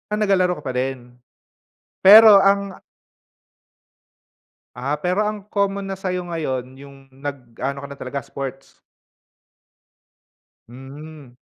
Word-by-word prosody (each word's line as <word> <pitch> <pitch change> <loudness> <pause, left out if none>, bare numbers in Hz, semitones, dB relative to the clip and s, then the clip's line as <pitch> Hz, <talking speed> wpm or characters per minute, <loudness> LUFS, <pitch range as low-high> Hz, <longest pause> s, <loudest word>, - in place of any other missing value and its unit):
Ah, 210 - -1
naglalaro 185 -5 +1
ka - - -15
pa 130 - -4
din? 125 -1 -4 0.8
Pero 210 +1 +9
ang 200 0 +1 2.0
Ah, 130 +4 -2
pero 185 +4 0
ang 210 -1 -5
common 200 -1 -1
na 190 - -6
sa'yo 180 -1 -3
ngayon 130 -5 -4
yung 140 0 -13 0.2
nag-ano 135 0 -6
ka - - -7
na 140 - -10
talaga, 135 +2 -5
sports. 135 0 -9 1.9
Hmm. 135 +2 -12
145 Hz, 110 wpm, -21 LUFS, 135-195 Hz, 2.0 s, Pero